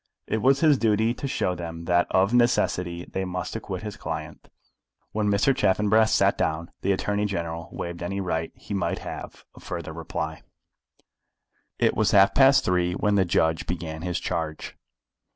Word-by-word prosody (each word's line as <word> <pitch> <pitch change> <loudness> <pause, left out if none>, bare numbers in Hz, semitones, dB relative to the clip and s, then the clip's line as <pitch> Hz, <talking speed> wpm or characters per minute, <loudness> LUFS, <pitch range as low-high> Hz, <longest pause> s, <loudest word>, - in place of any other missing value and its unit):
It 110 - -1
was 135 +3 +3
his 150 -5 +5
duty 110 +1 +2
to 140 - -5
show 90 -8 0
them 85 -1 -7
that, 90 0 +2
of 95 +4 +2
necessity, 90 -8 +1
they 95 - -4
must 90 -1 -4
acquit - - -5
his - - -6
client. - - -6 0.6
When 105 -1 -1
Mr. 100 +7 +3
Chaffanbrass 110 -1 +3
sat - - +3
down, 80 +2 -1
the 100 - +1
Attorney 105 +2 0
General 85 -4 -4
waived 85 0 -6
any 95 +3 -3
right 80 -4 -2
he - - -8
might 100 - -1
have - - -8
of - - -15
further - - -6
reply. 80 +1 -5 1.4
It - - +2
was - - +2
half 100 -1 +5
past 135 +2 +5
three 90 -1 +1
when 105 +3 0
the 95 -2 +3
judge 80 -2 +1
began 80 -2 -4
his 90 0 -2
charge. 80 -2 -4
95 Hz, 170 wpm, -25 LUFS, 85-105 Hz, 1.4 s, his